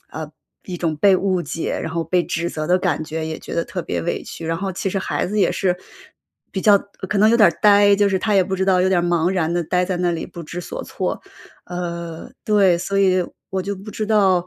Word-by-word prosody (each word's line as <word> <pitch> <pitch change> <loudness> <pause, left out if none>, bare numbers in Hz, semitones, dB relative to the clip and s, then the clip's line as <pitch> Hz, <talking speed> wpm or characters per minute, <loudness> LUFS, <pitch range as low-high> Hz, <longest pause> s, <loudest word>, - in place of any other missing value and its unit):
啊， 155 0 -6 0.4
一 180 -2 -6
种 160 -3 -1
被 195 +4 +5
误 185 -2 0
解， 165 - -3
然 160 - -4
后 165 0 -1
被 180 -1 +1
指 170 +1 -2
责 155 -2 -4
的 180 +1 +3
感 165 -4 -1
觉 160 +1 -4
也 160 0 -4
觉 - - -8
得 170 - 0
特 180 - -4
别 - - -3
委 170 - -2
屈。 165 - -8
然 165 0 -1
后 195 +1 -3
其 195 - -2
实 195 +1 -1
孩 - - -2
子 210 +4 -2
也 200 - +3
是， 180 -2 0 0.8
比 190 - -3
较 205 -2 +6 0.3
可 210 - 0
能 215 +2 +6
有 235 - +4
点 185 -8 +5
呆， 205 -1 +6
就 205 0 +3
是 190 -1 +1
他 210 +1 0
也 190 - +5
不 190 +1 -3
知 190 - 0
道 185 -2 +3
有 185 - +3
点 175 -2 +2
茫 175 0 +2
然 170 -3 0
地 175 0 0
待 180 +3 +1
在 180 -1 -2
那 175 -1 +1
里 165 - -3
不 170 - -9
知 170 +3 -7
所 - - -6
措。 - - -3 0.4
呃， 170 +2 -6
对。 195 -5 +4
所 195 +2 -2
以 185 -2 +3 0.3
我 190 0 -1
就 200 +1 -3
不 200 +3 -10
知 215 0 -3
道， 190 -5 +3
180 Hz, 270 characters per minute, -21 LUFS, 170-195 Hz, 0.8 s, 较